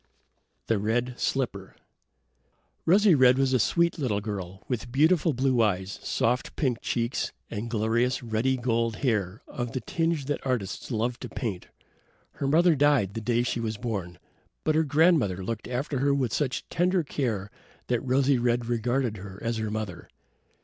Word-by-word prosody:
The 115 Hz, -3 st, +1 dB
Red 120 Hz, +4 st, -1 dB
Slipper 105 Hz, -8 st, -2 dB, 1.1 s
Rosy 200 Hz, +2 st, +6 dB
red 130 Hz, -3 st, +6 dB
was 135 Hz, -1 st, +2 dB
a 130 Hz, -, +4 dB
sweet 170 Hz, -, +2 dB
little 115 Hz, -8 st, 0 dB
girl, 95 Hz, -3 st, -6 dB
with 120 Hz, -1 st, -3 dB
beautiful 155 Hz, +4 st, +3 dB
blue 130 Hz, -2 st, +2 dB
eyes, 95 Hz, -2 st, 0 dB
soft 125 Hz, +2 st, 0 dB
pink 125 Hz, -6 st, 0 dB
cheeks 115 Hz, 0 st, -1 dB, 0.2 s
and 115 Hz, +2 st, -4 dB
glorious 115 Hz, +3 st, +1 dB
ruddy 120 Hz, +3 st, 0 dB
gold 115 Hz, -2 st, 0 dB
hair 105 Hz, -3 st, 0 dB
of 120 Hz, -4 st, -5 dB
the -, -, -1 dB
tinge 165 Hz, +2 st, -1 dB
that 145 Hz, +1 st, -2 dB
artists 125 Hz, -8 st, -2 dB
love 120 Hz, +1 st, -1 dB
to -, -, -7 dB
paint. 100 Hz, -7 st, -4 dB, 0.6 s
Her 140 Hz, -, -3 dB
mother 165 Hz, +4 st, +5 dB
died 140 Hz, -9 st, +3 dB
the 115 Hz, -, -4 dB
day 120 Hz, +1 st, +1 dB
she 120 Hz, -, -1 dB
was 110 Hz, -2 st, -3 dB
born, 100 Hz, -7 st, -4 dB, 0.5 s
but 155 Hz, -, +2 dB
her 160 Hz, +1 st, +3 dB
grandmother 145 Hz, -, +3 dB
looked 110 Hz, +3 st, -4 dB
after 130 Hz, +2 st, -2 dB
her 140 Hz, +1 st, +2 dB
with 130 Hz, -5 st, 0 dB
such 140 Hz, -4 st, -1 dB
tender 180 Hz, 0 st, +2 dB
care 110 Hz, -9 st, -2 dB, 0.3 s
that 120 Hz, -1 st, 0 dB
Rosy 130 Hz, 0 st, +2 dB
red 120 Hz, 0 st, +1 dB
regarded 120 Hz, 0 st, 0 dB
her 95 Hz, 0 st, -9 dB
as 115 Hz, 0 st, -1 dB
her 110 Hz, -1 st, -2 dB
mother. 105 Hz, -5 st, -5 dB
120 Hz, 165 wpm, -27 LUFS, 110-135 Hz, 1.1 s, Rosy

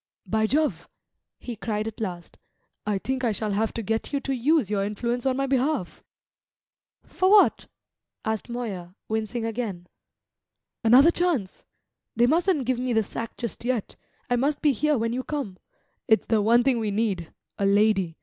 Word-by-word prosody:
"By 220 Hz, 0 st, +1 dB
Jove," 300 Hz, +4 st, 0 dB, 0.5 s
he 240 Hz, -, -7 dB
cried 215 Hz, -1 st, -3 dB
at 225 Hz, 0 st, -7 dB
last, 175 Hz, -5 st, -6 dB, 0.5 s
"I 210 Hz, -2 st, +1 dB
think 260 Hz, +6 st, -3 dB
I 235 Hz, -, +2 dB
shall 210 Hz, 0 st, -2 dB
have 215 Hz, +2 st, 0 dB
to 230 Hz, -, -3 dB
get 225 Hz, +2 st, -2 dB
you 285 Hz, -, 0 dB
to 275 Hz, -, -2 dB
use 260 Hz, -, +2 dB
your 200 Hz, -2 st, +1 dB
influence 235 Hz, +5 st, -2 dB
on 260 Hz, -1 st, +1 dB
my 275 Hz, -, +1 dB
behalf!" 270 Hz, -, -1 dB, 1.0 s
"For 370 Hz, -, +1 dB
what?" 415 Hz, 0 st, +5 dB, 0.6 s
asked 220 Hz, +1 st, -2 dB
Moya, 195 Hz, -7 st, -5 dB
wincing 220 Hz, +1 st, -2 dB
again. 220 Hz, -6 st, -4 dB, 1.0 s
"Another 255 Hz, +8 st, +7 dB
chance! 335 Hz, -, -1 dB, 0.5 s
They 235 Hz, +1 st, +4 dB
mustn't 325 Hz, 0 st, +2 dB
give 255 Hz, 0 st, 0 dB
me 250 Hz, -1 st, -1 dB
the 220 Hz, -1 st, +3 dB
sack 230 Hz, +3 st, -6 dB
just 235 Hz, -3 st, -5 dB
yet 240 Hz, -4 st, -2 dB, 0.3 s
I 245 Hz, -, +1 dB
must 285 Hz, +5 st, 0 dB
be 295 Hz, -, +5 dB
here 300 Hz, +3 st, +1 dB
when 230 Hz, 0 st, -1 dB
you 255 Hz, +1 st, -2 dB
come. 260 Hz, -12 st, -4 dB, 0.5 s
It's 220 Hz, -, +3 dB
the 220 Hz, -2 st, +2 dB
one 235 Hz, +3 st, +4 dB
thing 255 Hz, -2 st, +2 dB
we 220 Hz, -2 st, -1 dB
need 200 Hz, -5 st, -1 dB, 0.3 s
a 200 Hz, -, +2 dB
lady. 200 Hz, -4 st, +2 dB
230 Hz, 170 wpm, -25 LUFS, 210-260 Hz, 1.0 s, Another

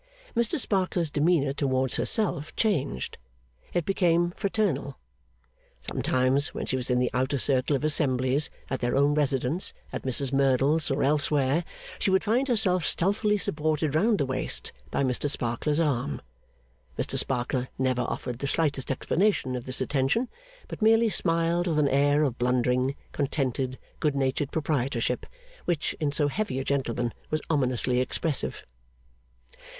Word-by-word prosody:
Mr 235 Hz, +7 st, +1 dB
Sparkler's 185 Hz, -, 0 dB
demeanour 145 Hz, -2 st, +2 dB
towards 130 Hz, -2 st, 0 dB
herself 175 Hz, -9 st, +1 dB
changed. 150 Hz, -, -1 dB, 0.5 s
It 175 Hz, -3 st, -1 dB
became 175 Hz, -3 st, +2 dB
fraternal. 195 Hz, -, -1 dB, 0.8 s
Sometimes, 130 Hz, +2 st, 0 dB
when -, -, -3 dB
she -, -, -1 dB
was 130 Hz, -1 st, -3 dB
in 125 Hz, -, +2 dB
the 125 Hz, 0 st, +1 dB
outer 130 Hz, +2 st, 0 dB
circle 130 Hz, +2 st, +2 dB
of 135 Hz, -, -3 dB
assemblies 140 Hz, -2 st, +3 dB, 0.2 s
at 130 Hz, -, -1 dB
their 120 Hz, +1 st, -1 dB
own 140 Hz, +2 st, +3 dB
residence, 145 Hz, +2 st, 0 dB, 0.2 s
at -, -, -3 dB
Mrs 130 Hz, +1 st, +2 dB
Merdle's, 135 Hz, +3 st, +2 dB
or 135 Hz, -, 0 dB
elsewhere 145 Hz, +1 st, +2 dB, 0.4 s
she -, -, +1 dB
would 190 Hz, 0 st, +3 dB
find 240 Hz, +5 st, +1 dB
herself 195 Hz, -, +2 dB
stealthily 210 Hz, +5 st, +2 dB
supported 155 Hz, -4 st, -1 dB
round 210 Hz, +7 st, +3 dB
the 140 Hz, -, 0 dB
waist 130 Hz, 0 st, -1 dB, 0.2 s
by -, -, 0 dB
Mr 130 Hz, +2 st, +1 dB
Sparkler's 135 Hz, +4 st, -1 dB
arm. 125 Hz, -, 0 dB, 0.8 s
Mr -, -, -1 dB
Sparkler 125 Hz, +1 st, 0 dB
never 130 Hz, -1 st, 0 dB
offered 125 Hz, 0 st, -4 dB
the 140 Hz, -, -2 dB
slightest 145 Hz, -3 st, 0 dB
explanation 150 Hz, 0 st, 0 dB
of 125 Hz, -, -5 dB
this 130 Hz, -, +1 dB
attention; 145 Hz, -, 0 dB, 0.4 s
but -, -, -8 dB
merely 225 Hz, +1 st, +4 dB
smiled 170 Hz, -1 st, +1 dB
with 160 Hz, -3 st, 0 dB
an 150 Hz, -2 st, +3 dB
air 145 Hz, +2 st, +3 dB
of 130 Hz, -5 st, -1 dB
blundering, 125 Hz, +2 st, +1 dB, 0.2 s
contented, 135 Hz, -3 st, -2 dB, 0.2 s
good 150 Hz, -2 st, 0 dB
natured 135 Hz, +1 st, -1 dB
proprietorship, 130 Hz, -6 st, -1 dB, 0.4 s
which, 165 Hz, -4 st, -1 dB
in 150 Hz, -2 st, 0 dB
so 145 Hz, +1 st, +1 dB
heavy 175 Hz, -3 st, -2 dB
a 135 Hz, -, -2 dB
gentleman, 120 Hz, -4 st, -1 dB, 0.2 s
was 155 Hz, -, 0 dB
ominously 125 Hz, -3 st, +1 dB
expressive. 145 Hz, +3 st, -1 dB
140 Hz, 145 wpm, -27 LUFS, 130-165 Hz, 0.8 s, merely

